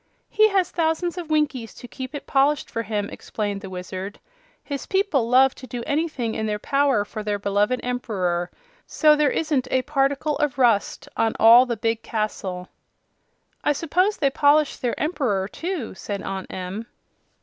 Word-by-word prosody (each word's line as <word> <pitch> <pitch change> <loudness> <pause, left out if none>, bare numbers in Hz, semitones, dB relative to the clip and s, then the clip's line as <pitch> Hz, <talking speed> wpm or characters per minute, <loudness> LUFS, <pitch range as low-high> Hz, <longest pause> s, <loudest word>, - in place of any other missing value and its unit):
"He 435 0 +5
has 385 -3 +1
thousands 340 +2 0
of 335 -3 -7
Winkies 285 -7 0
to 245 - -10
keep 260 +3 -7
it 285 - -6
polished 280 +2 +1
for 230 - -2
him," 210 -2 -2
explained 205 -2 -4
the 195 - -8
Wizard. 185 +2 -6 0.4
"His 280 -2 -5
people 350 - +1
love 260 +1 +5
to 255 - -11
do 245 -1 -5
anything 285 -7 -1
in 220 0 -2
their 210 0 -1
power 275 -2 +1
for 215 +1 -6
their 210 -1 -1
beloved 205 +5 +1
Emperor, 185 -8 -1 0.4
so 305 -1 +4
there 300 -1 +3
isn't 290 -5 0
a 260 0 +1
particle 285 +1 0
of 295 -3 -1
rust 240 +2 +2
on 225 -1 +1
all 235 +3 +8
the 235 -2 -2
big 225 +1 -1
castle." 195 -5 -3 1.0
"I 295 - +3
suppose 360 +7 +1
they 275 -3 +2
polish 290 +1 +3
their 245 -2 -2
Emperor, 250 - 0
too," 330 - -4
said 200 +1 -5
Aunt 190 -1 -5
Em. 190 +5 -5
250 Hz, 170 wpm, -23 LUFS, 210-295 Hz, 1.0 s, all